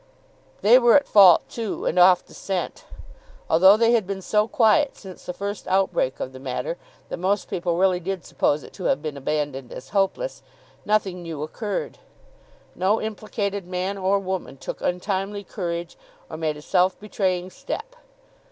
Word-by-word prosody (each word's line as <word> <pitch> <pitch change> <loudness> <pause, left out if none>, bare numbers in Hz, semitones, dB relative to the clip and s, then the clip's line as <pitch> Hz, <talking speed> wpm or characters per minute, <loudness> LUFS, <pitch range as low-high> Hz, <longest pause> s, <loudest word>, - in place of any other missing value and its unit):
They 235 +5 +7
were 240 -2 +5
at 285 -1 +4
fault 190 -5 +7
too, 225 -3 -4
and 180 - +1
off 180 0 +6
the - - -17
scent. 190 -2 -4 0.7
Although 190 +5 +7
they 230 +1 +4
had 225 -5 +2
been 195 -1 -4
so 210 +2 +2
quiet 260 +2 +3
since 190 -3 -11
the - - -1
first 200 +2 -5
outbreak 190 -8 +1
of 130 - -5
the 130 - -10
matter, 130 +5 -4 0.3
that - - -4
most 190 +3 0
people 170 -1 -2
really 185 -1 +3
did 185 0 -4
suppose 145 +1 0
it - - -13
to 185 - -8
have 150 - +1
been 155 -2 -4
abandoned 140 -2 -3
as - - -9
hopeless, 205 - -1 0.4
nothing 195 -4 0
new 160 -3 -5
occurred. 205 +6 -4 0.7
No 195 +5 +1
implicated 205 -3 -4
man 185 +2 -2
or 195 +1 +1
woman 190 -7 -4
took - - -7
untimely 195 +3 -2
courage, 170 -4 -5 0.3
or - - -5
made 155 -1 -2
a 150 - -12
self 185 +1 +2
betraying 185 -3 -2
step. - - -6
190 Hz, 170 wpm, -24 LUFS, 175-205 Hz, 0.7 s, They